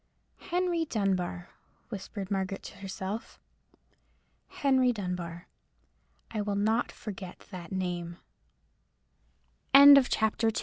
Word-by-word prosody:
"Henry 350 -1 -1
Dunbar," 185 - -2 0.4
whispered 200 -1 -6
Margaret 195 0 -2
to - - -10
herself—"Henry 225 +6 -4
Dunbar. 180 -5 -5 0.8
I 215 -2 -2
will 205 -1 -2
not 220 +4 +1
forget 190 -4 -9
that 180 -3 -8
name." 175 -2 -3 1.6
CHAPTER 275 -6 +7
III. 225 - +1
200 Hz, 85 wpm, -29 LUFS, 185-230 Hz, 1.6 s, CHAPTER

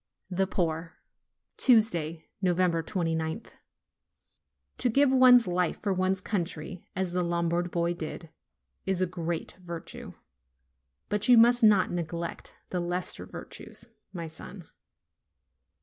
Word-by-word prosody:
THE 190 +1 +1
POOR 165 -1 -2 0.6
Tuesday, 170 -10 +3 0.2
29th. 170 0 0 1.3
To 250 - +3
give 275 +3 +4
one's 255 -2 +7
life 180 -2 0
for 200 -2 -1
one's 185 +1 0
country 175 -3 -4
as 185 -1 -1
the 180 +1 0
Lombard 170 0 0
boy 170 0 0
did, 165 0 -7 0.6
is 190 -1 +1
a - - +3
great 170 -2 -4
virtue; 170 -2 -8 0.9
but 210 +2 0
you 245 - +8
must 240 +2 +6
not 210 -4 +5
neglect 170 0 -5 0.2
the 180 - -1
lesser 175 +1 -2
virtues, - - -9 0.2
my 170 -3 -5
son. 160 +2 -10
180 Hz, 115 wpm, -28 LUFS, 170-195 Hz, 1.3 s, you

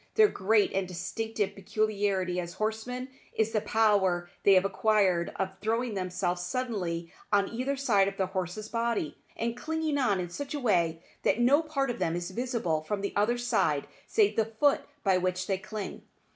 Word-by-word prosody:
Their 430 -1 +7
great 210 - +2
and 190 -1 0
distinctive 205 +4 -3
peculiarity 200 -3 0
as 175 -1 -5
horsemen 220 +4 -3 0.3
is 220 0 +1
the 215 - +1
power 200 -5 +2
they 200 - +6
have 185 +1 +4
acquired 195 -4 +2
of 190 0 -1
throwing 230 +2 0
themselves 180 -2 -1
suddenly 180 -5 -3 0.2
on 200 -1 +3
either 260 +4 -1
side 215 -8 +3
of 195 0 -4
their 190 - +1
horse's 185 +2 -4
body, 230 -9 -1 0.2
and 230 0 -1
clinging 315 +1 -1
on 205 -8 +2
in 175 -1 -4
such 285 +9 -5
a - - -2
way 170 -9 +1 0.2
that - - +2
no 270 +6 +5
part 280 -5 -1
of - - -7
them 165 - 0
is 175 +1 -4
visible 225 -8 -1
from 200 +5 -3
the 200 - -3
other 215 +4 +2
side 235 - +1 0.2
save 420 -2 +3
the 225 - +3
foot 225 +6 +2 0.2
by 190 -2 +3
which 185 0 -1
they 190 -1 -1
cling. 210 0 -6
205 Hz, 180 wpm, -29 LUFS, 185-235 Hz, 0.3 s, Their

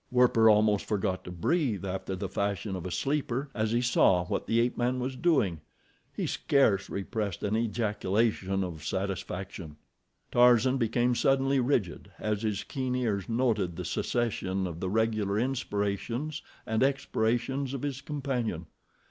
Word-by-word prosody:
Werper 125 -3 +5
almost 105 -1 +4
forgot 95 -3 -1
to 90 - -8
breathe 105 - 0
after 95 0 -3
the 95 +1 -4
fashion 100 0 -2
of 90 -1 -5
a - - -4
sleeper 135 - -1
as 110 -1 -1
he 120 +1 +2
saw 95 -7 +4
what - - -3
the 115 - +2
ape 120 +1 +1
man 125 +1 0
was 130 +1 -3
doing—he 120 - -2
scarce 110 -9 +2
repressed 100 -1 -3
an 105 +1 0
ejaculation 105 -3 0
of 80 -5 -6
satisfaction. 95 -3 -4 0.6
Tarzan 125 +1 +5
become 120 +1 +1
suddenly 135 +2 +2
rigid 120 -8 -1
as 105 -1 -2
his 105 -3 -1
keen 130 -2 -3
ears 110 -6 -1
noted 115 -7 +1
the 90 +1 -5
cessation 95 -2 -1
of 85 -2 -5
the 95 - -2
regular 110 -1 +1
inspirations 120 +4 -2 0.2
and 110 0 0
expirations 135 0 0
of 135 - -6
his 140 -2 -3
companion. 130 - -3
110 Hz, 145 wpm, -29 LUFS, 95-125 Hz, 0.6 s, Werper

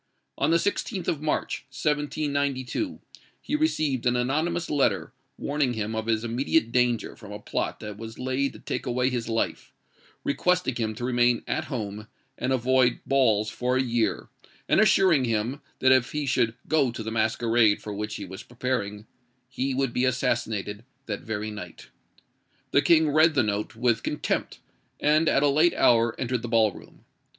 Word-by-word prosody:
On - - +1
the 165 - +5
16th 195 0 -2
of 150 - -1
March, 155 - -1
1792, 145 - -1 0.4
he 295 - -3
received 155 - 0
an 125 - +2
anonymous 155 +8 0
letter, 145 -2 0 0.2
warning 140 -3 0
him 110 -1 -3
of 110 0 -3
his 110 -1 +1
immediate 120 +2 +1
danger 125 -2 +1
from 105 -2 -12
a 105 - -5
plot 105 - -3
that 105 -1 -7
was 115 0 -8
laid 130 +2 -1
to - - -12
take - - -4
away 125 +1 +1
his 120 -2 -3
life, 115 0 -2 0.5
requesting 180 0 +1
him 110 -2 -2
to 120 - -4
remain 120 -1 +2
at - - -2
home, 105 -5 -5 0.3
and 130 - -2
avoid 130 -1 +2
balls 110 -6 +2
for 125 +1 0
a 130 - +2
year; 115 -4 0 0.4
and - - +4
assuring 190 -9 +4
him, 115 +4 -1 0.2
that 130 - +4
if 130 -2 +3
he 150 -1 -1
should 120 -4 +1
go 150 -5 +3
to 115 -1 -6
the 110 - -4
masquerade 110 -1 +2
for 105 - -7
which 105 +1 -4
he 100 - -6
was 95 +1 -9
preparing, 115 -4 -3 0.4
he 130 +1 -2
would 135 -2 0
be 125 - +1
assassinated 115 -4 -1 0.2
that 100 -3 -4
very 110 -1 -4
night. 105 -1 -9 0.8
The 140 - +4
King 160 -2 +4
read 155 +1 +4
the 130 - +4
note 105 +1 -2
with 120 0 +1
contempt, - - -2 0.4
and 155 +2 +3
at 140 - +3
a - - +5
late 155 +5 +3
hour 115 -1 +3
entered 125 -2 -1
the 120 - -5
ball 110 -2 +3
room. - - -15
125 Hz, 175 wpm, -26 LUFS, 110-140 Hz, 0.8 s, the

